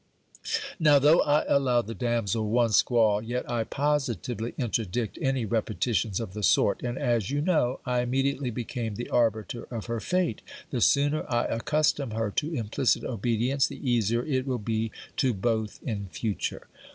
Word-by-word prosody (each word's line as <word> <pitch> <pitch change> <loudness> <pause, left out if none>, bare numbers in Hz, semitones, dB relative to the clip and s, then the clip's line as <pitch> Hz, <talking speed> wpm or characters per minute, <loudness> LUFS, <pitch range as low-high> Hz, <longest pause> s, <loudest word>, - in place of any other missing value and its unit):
Now, 150 -3 +6
though 150 +4 +5
I 145 +1 +3
allow 125 -4 +2
the 115 - -6
damsel 115 -3 -1
one 115 0 +2
squall, 110 -2 +3
yet 120 +3 -3
I 120 -2 0
positively 130 -5 -1
interdict 115 -3 -2
any 135 -3 0
repetitions 110 -2 0
of 110 -5 -5
the 105 - -5
sort; 90 - +3
and 120 +1 -3
as, 115 -4 0
you 145 +1 0
know, 150 -6 +1
I 125 -1 +1
immediately 135 +1 0
became 115 -2 -4
the 120 - -6
arbiter 115 0 0
of 115 -4 -5
her 115 -1 -3
fate, 180 +7 -1 0.3
the 125 - -1
sooner 145 +4 +3
I 120 0 +2
accustom 145 +2 0
her 110 -2 -1
to 150 +9 -1
implicit 115 +2 0
obedience, 120 +4 0
the 140 - -7
easier 120 -1 +2
it 130 -3 -1
will 130 -2 0
be 110 0 -2 0.3
to 130 -5 +2
both 110 +1 -1
in 100 -5 -3
future. 105 +2 -3
120 Hz, 165 wpm, -27 LUFS, 110-135 Hz, 0.3 s, Now